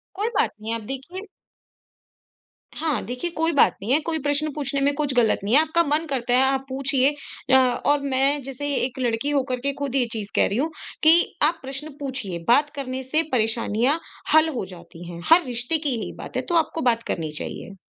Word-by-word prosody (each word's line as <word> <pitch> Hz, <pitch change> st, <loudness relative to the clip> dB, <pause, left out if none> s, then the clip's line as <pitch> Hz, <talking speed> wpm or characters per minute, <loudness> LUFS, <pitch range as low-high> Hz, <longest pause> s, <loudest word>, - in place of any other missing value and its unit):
कोई 410 Hz, +3 st, -1 dB
बात -, -, +2 dB
नहीं 225 Hz, +1 st, -3 dB
आप 230 Hz, -, -5 dB
देखिए 350 Hz, +10 st, -7 dB, 1.5 s
हाँ, 305 Hz, -8 st, -1 dB
देखिए 250 Hz, +8 st, -3 dB
कोई 325 Hz, 0 st, 0 dB
बात 285 Hz, -, +4 dB
नहीं 210 Hz, +5 st, -3 dB
है। 300 Hz, -, +4 dB
कोई 325 Hz, -1 st, -1 dB
प्रश्न 290 Hz, +1 st, +1 dB
पूछने 280 Hz, -1 st, -2 dB
में 285 Hz, +1 st, +2 dB
कुछ 290 Hz, -2 st, -1 dB
ग़लत 235 Hz, -3 st, +3 dB
नहीं 205 Hz, +3 st, -1 dB
है। 300 Hz, -, +7 dB
आपका 320 Hz, +2 st, +2 dB
मन 305 Hz, +1 st, +1 dB
करता 245 Hz, -3 st, -1 dB
है, 255 Hz, -, +5 dB
आप 265 Hz, 0 st, +1 dB
पूछिए 270 Hz, 0 st, +2 dB, 0.4 s
अ, -, -, +7 dB
और 260 Hz, +3 st, +2 dB
मैं 275 Hz, +1 st, +1 dB
जैसे 275 Hz, +2 st, -4 dB
एक 260 Hz, 0 st, -1 dB
लड़की 240 Hz, +2 st, -1 dB
होकर 265 Hz, -3 st, -1 dB
के 280 Hz, -, +1 dB
खुद 280 Hz, -2 st, -3 dB
ये 260 Hz, -3 st, +3 dB
चीज़ 210 Hz, -3 st, -5 dB
कह -, -, +4 dB
रही 200 Hz, -, -2 dB
हूँ 310 Hz, +5 st, 0 dB, 0.3 s
कि 330 Hz, +3 st, +5 dB
आप 325 Hz, +3 st, +3 dB
प्रश्न 275 Hz, +3 st, -6 dB
पूछिए। 255 Hz, -11 st, -4 dB
बात 285 Hz, +5 st, +4 dB
करने 265 Hz, -2 st, -4 dB
से 310 Hz, +5 st, +1 dB
परेशानियाँ 230 Hz, +4 st, +1 dB, 0.3 s
हल 315 Hz, +1 st, +6 dB
हो 200 Hz, -, -3 dB
जाती 170 Hz, 0 st, -13 dB
हैं। 170 Hz, 0 st, -8 dB
हर 345 Hz, +2 st, +7 dB
रिश्ते 245 Hz, +5 st, +1 dB
की 300 Hz, -1 st, -2 dB
यही -, -, -5 dB
बात -, -, -9 dB
है, -, -, +1 dB
तो 345 Hz, -, -3 dB
आपको 325 Hz, 0 st, +1 dB
बात 230 Hz, -3 st, +1 dB
करनी 160 Hz, -3 st, -3 dB
चाहिए। 175 Hz, +5 st, -6 dB
270 Hz, 210 wpm, -23 LUFS, 245-300 Hz, 1.5 s, है